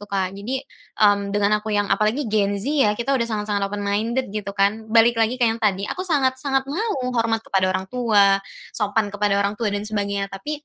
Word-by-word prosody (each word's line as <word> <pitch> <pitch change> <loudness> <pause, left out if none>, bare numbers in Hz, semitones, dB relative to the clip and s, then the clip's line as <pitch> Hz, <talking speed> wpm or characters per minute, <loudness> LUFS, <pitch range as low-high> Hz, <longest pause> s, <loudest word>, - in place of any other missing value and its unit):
Kak. 190 -2 -1
Jadi, 210 +7 -4 0.4
mmm, 205 -1 +2
dengan 210 +1 +2
aku 220 - -7
yang 205 -1 +1
apalagi 215 +8 +1
Gen 200 -1 +1
Z 200 - -5
ya, 270 -9 +3
kita 260 +4 -1
udah 235 -3 +1
sangat-sangat 210 -2 -2
open 205 0 -4
minded 225 +6 0
gitu 200 -1 -5
kan. 215 +3 +1
Balik 230 +1 +4
lagi 225 +3 +1
ke 245 - +2
yang 225 0 0
tadi, 200 -2 +1
aku 365 - -5
sangat-sangat 270 -2 +1
mau 280 - -2
hormat 225 -1 0
kepada 190 -1 +1
orang 185 0 -1
tua, 205 -5 +3 0.3
sopan 210 -1 -1
kepada 205 -1 +1
orang 200 0 +1
tua, 215 0 -2
dan 205 +1 -3
sebagainya, 200 -2 -3
tapi, 295 +10 -6
210 Hz, 205 wpm, -22 LUFS, 200-235 Hz, 0.4 s, Balik